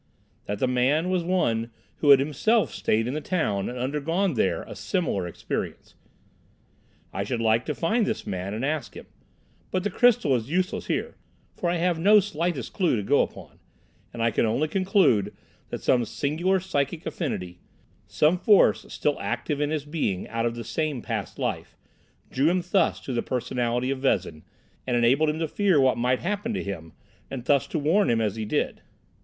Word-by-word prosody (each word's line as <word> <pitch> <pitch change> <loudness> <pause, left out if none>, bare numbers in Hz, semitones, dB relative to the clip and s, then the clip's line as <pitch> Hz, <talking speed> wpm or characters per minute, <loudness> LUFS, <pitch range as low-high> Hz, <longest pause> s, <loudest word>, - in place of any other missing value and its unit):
"That 105 - -3
the 130 - +1
man 135 +8 +1
was 180 -2 +1
one 120 -11 0 0.3
who 145 - +1
had 140 - +10
himself 155 - +1
stayed 110 +1 +1
in 125 - -2
the 155 - -3
town 145 - -1
and 125 - -6
undergone 150 +8 0
there 120 - 0
a - - -10
similar 100 - -1
experience. 85 - -5 1.2
I 95 - -2
should 115 +3 -3
like 115 +1 +2
to 150 - -2
find 220 +6 +1
this 220 - -3
man 95 +2 -4
and 115 +5 -2
ask 150 0 -3
him. - - -9 0.6
But 185 -1 -1
the 205 - -1
crystal 235 - +4
is 120 +1 -3
useless 180 +3 -1
here, - - -2 0.4
for 175 - -1
I 175 - +1
have 175 -1 0
no 210 +5 +6
slightest 170 - -2
clue 180 -8 +2
to 105 - -2
go - - +3
upon, - - -6 0.5
and 115 -1 -3
I 115 - +3
can - - +1
only 115 +7 +1
conclude 185 - +2 0.3
that - - -6
some 125 -2 +3
singular 170 - 0
psychic 160 -3 -2
affinity, 90 - -4 0.5
some 160 +4 +2
force 205 0 +4
still 150 -1 -1
active 120 +8 -2
in 145 - +1
his 150 -2 -2
being 145 - -2
out 115 +1 0
of 115 - -3
the 120 - -5
same 150 0 -2
past 110 -7 -4
life, - - -3 0.5
drew 140 +5 +2
him 180 0 +1
thus 190 -4 +2
to 130 - -5
the 120 - 0
personality 125 0 -1
of 135 - -2
Vezin, 85 - 0 0.5
and 125 -1 +1
enabled 130 +6 +3
him 150 - -1
to 160 0 -1
fear 190 -1 +2
what 130 -1 +4
might 125 +2 +1
happen 205 +4 -2
to - - -2
him, 80 -5 -6 0.4
and 130 -3 -6
thus 140 -1 +3
to - - -3
warn 165 +8 +2
him 115 -1 +2
as 105 -2 0
he 110 -1 -4
did. 105 - -1
140 Hz, 190 wpm, -25 LUFS, 115-175 Hz, 1.2 s, had